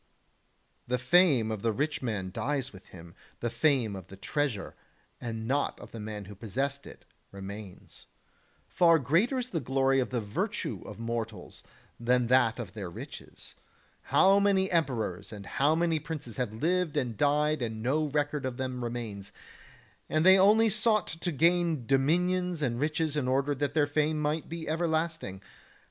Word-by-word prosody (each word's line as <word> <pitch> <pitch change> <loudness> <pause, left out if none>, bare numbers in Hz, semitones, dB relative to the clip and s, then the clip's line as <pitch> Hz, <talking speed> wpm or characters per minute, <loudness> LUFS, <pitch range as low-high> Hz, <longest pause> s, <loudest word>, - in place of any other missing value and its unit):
The 125 +1 +1
fame 130 -4 +4
of 110 -2 -4
the 115 - +1
rich 145 +7 -1
man 105 -7 -3
dies 135 +2 -2
with 95 -1 -14
him; 85 -1 -13 0.3
the 120 - -2
fame 130 -10 +2
of 95 -2 -9
the 95 - -11
treasure, 135 -1 -2 0.5
and 115 -1 -5
not 140 +3 0
of - - -11
the 115 - -8
man 105 -1 -6
who 105 - -10
possessed 135 +7 -3
it, - - -13 0.3
remains. 100 0 -9 0.6
Far 170 -2 +5
greater 170 - +2
is 250 -1 -3
the 170 - -1
glory 135 0 +2
of 125 - 0
the 125 - -1
virtue 105 -2 -3
of - - -8
mortals 115 -4 -5 0.4
than 125 +1 +2
that 120 -4 +4
of 110 -7 -6
their 100 -5 -5
riches. 85 - -10 0.5
How 195 +1 +5
many 195 -1 +2
emperors 120 - -1
and 100 -2 -8
how 145 +8 +2
many 165 -1 +1
princes 150 -7 -7
have 125 -4 -1
lived 170 +8 0
and 120 -3 -1
died 150 +3 +2
and 110 -2 -3
no 150 +6 +1
record 145 0 -1
of 130 -2 -3
them 130 -1 -3
remains, 110 -4 -5 0.8
and 155 +2 +1
they 190 +1 +8
only 215 +3 +5
sought 215 -1 +2
to 165 +2 -3
gain 165 -2 +2
dominions 175 +6 +1
and 120 -3 -1
riches 155 +1 0
in 140 -4 0
order 135 +3 +1
that 145 +1 -2
their 150 -2 +4
fame 150 +1 0
might 150 +1 -1
be 165 -1 -6
ever 165 +2 0
lasting. 160 - -2
135 Hz, 170 wpm, -29 LUFS, 115-160 Hz, 0.8 s, they